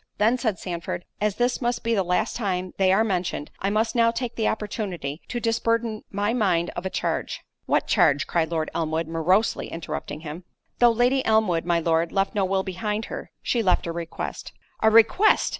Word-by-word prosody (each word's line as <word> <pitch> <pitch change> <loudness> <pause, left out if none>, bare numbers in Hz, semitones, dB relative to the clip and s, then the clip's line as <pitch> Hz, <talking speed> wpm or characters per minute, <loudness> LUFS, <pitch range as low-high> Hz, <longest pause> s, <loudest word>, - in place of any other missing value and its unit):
"Then," 225 +4 +3
said 220 -7 0
Sandford, 175 0 -5 0.2
"as 210 -2 +1
this 245 +1 0
must 240 -1 -1
be 230 - +1
the 205 - +2
last 180 +4 0
time 185 -5 -2
they 190 -1 +4
are 200 +4 +4
mentioned, 180 -7 -2
I 195 - 0
must 220 +2 +1
now 230 -1 +4
take 235 +1 -3
the 220 - 0
opportunity 190 -8 -3
to 240 - -3
disburden 230 -1 0
my 205 +3 -1
mind 180 -8 +1
of 180 +2 -4
a - - -3
charge"— - - -2 0.3
"What - - +2
charge?" 145 +2 +3
cried 165 -2 0
Lord 160 -2 -2
Elmwood, 160 0 -1
morosely 175 +7 +1
interrupting 160 -2 -6
him. 160 +2 -7 0.4
"Though 240 - +7
Lady 245 +3 +2
Elmwood, 215 -7 +2
my 170 -1 +2
Lord, 165 0 +1
left 195 0 0
no 200 -2 +1
will 190 0 0
behind 210 +3 -3
her, - - -6
she 240 - +1
left 185 -4 +2
a 170 - -2
request." 165 0 -6 0.3
"A 220 - +6
request!" 230 - +5
195 Hz, 190 wpm, -24 LUFS, 170-225 Hz, 0.4 s, Though